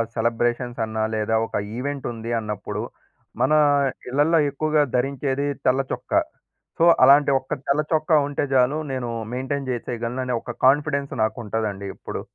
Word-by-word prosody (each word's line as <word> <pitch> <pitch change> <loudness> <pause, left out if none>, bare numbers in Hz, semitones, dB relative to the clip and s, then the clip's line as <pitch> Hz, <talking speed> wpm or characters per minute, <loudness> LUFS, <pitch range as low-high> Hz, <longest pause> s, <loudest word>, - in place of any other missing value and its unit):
Celebrations 120 +1 -1
అన్నా, 110 0 -2
లేదా 110 +1 0
ఒక - - -8 0.2
ఈవెంట్ 140 +1 -4
ఉంది 115 +1 -6
అన్నప్పుడు, 105 -2 -4 0.6
మన 135 +4 +3 0.6
ఇళ్లల్లో 150 +5 +3
ఎక్కువగా 150 +1 +1
ధరించేది 135 +2 -1 0.2
తెల్ల 130 +2 +3
చొక్క. - - -6 0.7
సో, 165 - +4 0.2
అలాంటి 140 +1 +6
ఒక 130 - -4
తెల్ల 145 +2 +3
చొక్క 155 +1 0 0.2
ఉంటే 145 - -1
చాలు, 130 +4 +3
నేను 125 -2 -3 0.2
మెయింటైన్ 130 +1 -3
చేసేయగలను, 120 +1 -4
అనే 125 - -1
ఒక 120 - -6
కాన్ఫిడెన్స్ 140 0 +2
నాకు 110 - 0
ఉంటుదండి 105 -2 -3
ఎప్పుడు. - - -6
130 Hz, 140 wpm, -23 LUFS, 115-140 Hz, 0.7 s, అలాంటి